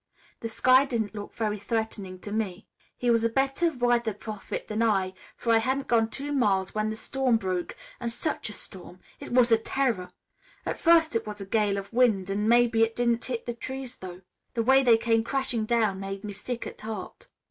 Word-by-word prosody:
The 230 - -4
sky 255 +4 +5
didn't 230 -6 -2
look 205 -1 -7
very 215 -2 -1
threatening 205 -3 -3
to 205 - -6
me. 210 -2 -2 0.3
"He 245 -1 +1
was 230 -1 +3
a 230 - +3
better 270 +7 +1
weather 240 -5 +1
prophet 210 -1 -6
than 215 +1 -2
I, 195 -5 +2 0.2
for 230 - +1
I 225 - +6
hadn't 265 +4 -1
gone 225 -2 +3
two 280 +5 -5
miles 200 -9 +1
when 215 0 0
the 220 - -3
storm 255 +1 +1
broke. 185 -4 -3 0.2
And 235 - -2
such 300 0 -2
a - - -7
storm! 185 -2 -7 0.2
It - - -9
was 245 -1 +4
a 225 - +6
terror! 225 -7 -1 0.6
At - - -3
first 330 -4 +5
it 230 - -1
was 210 0 -6
a 195 - -6
gale 205 0 +1
of 200 +2 -6
wind, 215 -6 +3
and 210 +2 0
maybe 235 -1 +4
it 225 0 +2
didn't 235 -1 +1
hit 245 -3 -3
the 240 - -3
trees, 260 +1 -5
though. 180 -1 -9 0.3
The 230 - +1
way 265 +3 +6
they 240 -4 +6
came 225 0 +2
crashing 255 -3 -1
down 220 -5 +2
made 195 0 -5
me 210 -1 -5
sick 240 +4 -5
at - - -8
heart. 215 -3 -7
225 Hz, 210 wpm, -27 LUFS, 205-245 Hz, 0.6 s, I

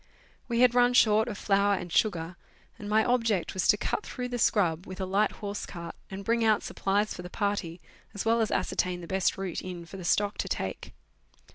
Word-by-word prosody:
We 235 -1 +1
had 250 -1 +6
run 245 0 +4
short 220 -2 +5
of 205 - -4
flour 200 0 +2
and 180 -2 -6
sugar, 175 -5 +1 0.4
and 205 - -6
my 215 +1 +3
object 230 -7 +1
was 190 - 0
to - - +5
cut - - -2
through 250 -1 -5
the 245 -1 -3
scrub 180 -6 +2
with 185 +1 -8
a 190 - -1
light 200 +3 +1
horse 205 -1 -5
cart 170 -2 -7 0.2
and 195 0 -7
bring 230 +1 +2
out 215 -2 +3
supplies 205 +2 0
for - - -7
the 180 - -8
party, 200 -4 -2 0.4
as 205 - -3
well 230 +1 +3
as 220 - +1
ascertain 180 -1 -1
the 170 - -9
best 190 0 0
route 190 -3 -4
in 180 -2 -7
for 195 - -10
the 185 - -8
stock 205 +4 +1
to - - -1
take. 95 - -4
200 Hz, 220 wpm, -28 LUFS, 180-220 Hz, 0.4 s, had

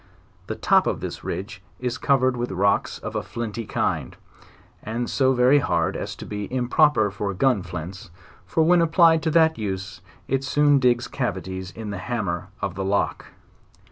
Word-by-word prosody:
The - - -3
top - - +3
of - - -1
this - - -6
ridge 95 -1 -5 0.2
is 125 -1 -3
covered 130 -2 +2
with 120 0 -3
rocks 100 +2 +1
of - - -7
a - - 0
flinty 115 -1 -5
kind, - - -2 0.6
and 115 +3 -3
so 130 -1 +2
very 130 +3 +5
hard 85 -10 0
as - - -4
to - - -9
be 105 -1 -5
impro 130 +4 +3
per 110 -7 +1
for 100 0 -3
gun 125 0 +2
flints, 90 +1 -7 0.3
for 105 - +1
when 175 +2 +5
applied 165 -1 +5
to 160 - 0
that 160 -3 +3
use 95 -3 -4 0.3
it 135 0 0
soon 145 +1 +3
digs 125 -1 +2
cavities 95 -6 -4
in 110 0 -7
the 100 - -5
hammer 95 -4 -3 0.2
of 100 - -1
the 95 +1 -4
lock. 100 +1 -1
115 Hz, 175 wpm, -24 LUFS, 95-135 Hz, 0.6 s, very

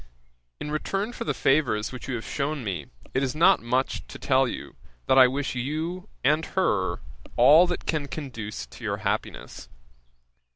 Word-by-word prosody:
In 150 - -5
return 195 +8 -2
for - - -5
the 150 - 0
favours 125 -7 +2
which 130 0 -8
you 130 - -2
have 115 - -5
shewn 145 -1 -2
me, 90 -9 -4 0.3
it 130 - +1
is 130 -1 -1
not 165 - +5
much 125 +3 0
to - - -9
tell 130 -1 +2
you, - - -6 0.3
that 130 - +5
I 130 - +9
wish 135 +2 -2
you 160 - -3
and 150 +4 +3
her 95 - +1 0.4
all 150 +9 +7
that 175 - -3
can 150 -3 -1
conduce 115 - -6
to - - -14
your - - -1
happiness. - - -3
135 Hz, 170 wpm, -26 LUFS, 120-155 Hz, 0.4 s, I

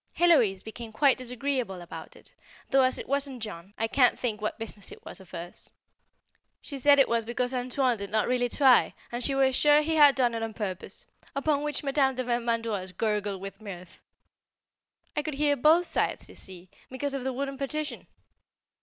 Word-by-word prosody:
Héloise 250 - +4
became 220 +1 -8
quite 270 +4 +3
disagreeable 250 -5 -3
about 175 -1 -10
it, - - -16 0.4
though 270 0 +5
as 255 0 +2
it - - -7
wasn't 275 -3 -2
Jean 195 -1 -8
I 225 - 0
can't 250 +1 +3
think 220 -4 -2
what 215 - -2
business 215 -3 -6
it - - -13
was - - -5
of 190 - -15
hers. 175 0 -8 0.9
She 280 -2 -7
said 285 +2 +6
it 275 - +5
was 230 0 +1
because 245 +2 -2
"Antoine" 250 -1 0
did 200 0 -5
not 215 -1 +1
really 245 -1 +1
try, 260 -1 +4 0.2
and 240 +1 -3
she 275 - +3
was 265 -1 +3
sure 295 +2 +5
he 320 +1 0
had 290 -2 +7
done 245 -3 +2
it 230 - -3
on 225 -1 -4
purpose, 190 -4 -4 0.3
upon 285 +1 +1
which 295 -1 -2
Madame 270 -1 +2
de 255 - -2
Vermandoise 230 -6 -1
gurgled 210 -3 -1
with 195 +1 -8
mirth. 185 -4 -10 1.2
I - - +1
could 300 -1 -4
hear 290 0 +2
both 315 +6 +4
sides - - -1
you - - -14
see, 185 -1 -11 0.2
because 275 +2 -3
of 275 -2 -3
the 265 - -1
wooden 275 +1 -4
partition. 300 +2 -4
250 Hz, 190 wpm, -28 LUFS, 215-275 Hz, 1.2 s, had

